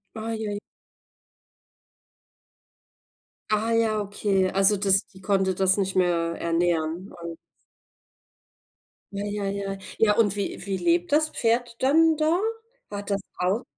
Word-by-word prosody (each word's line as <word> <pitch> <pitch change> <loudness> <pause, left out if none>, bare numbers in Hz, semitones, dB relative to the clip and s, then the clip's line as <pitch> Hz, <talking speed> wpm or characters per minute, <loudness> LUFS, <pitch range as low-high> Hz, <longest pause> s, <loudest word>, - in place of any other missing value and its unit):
Ui 220 0 -4
ui. 205 0 -3 2.9
Ah 215 +2 +1
ja, 225 -2 +2
okay. 200 -2 0
Also, 195 +2 +4
das 195 0 +2
die 190 -1 -17
konnte 190 -2 +1
das 190 0 +2
nicht 195 -1 -1
mehr 170 -2 +1
ernähren 170 +1 -1
und 170 -1 -6 1.8
Ja, 200 0 -4
ja, 205 0 -3 0.3
ja. - - -8 0.2
Ja, 210 -2 +4
und 205 -3 +3
wie 200 -2 -4
wie 195 -1 -2
lebt 345 - +1
das 310 +1 +4
Pferd 235 -1 0
dann 315 +4 +4
da? 315 +3 +2 0.5
Hat 205 0 -6
das 200 -1 0 0.2
auch 190 +7 0
205 Hz, 125 wpm, -25 LUFS, 190-225 Hz, 2.9 s, Also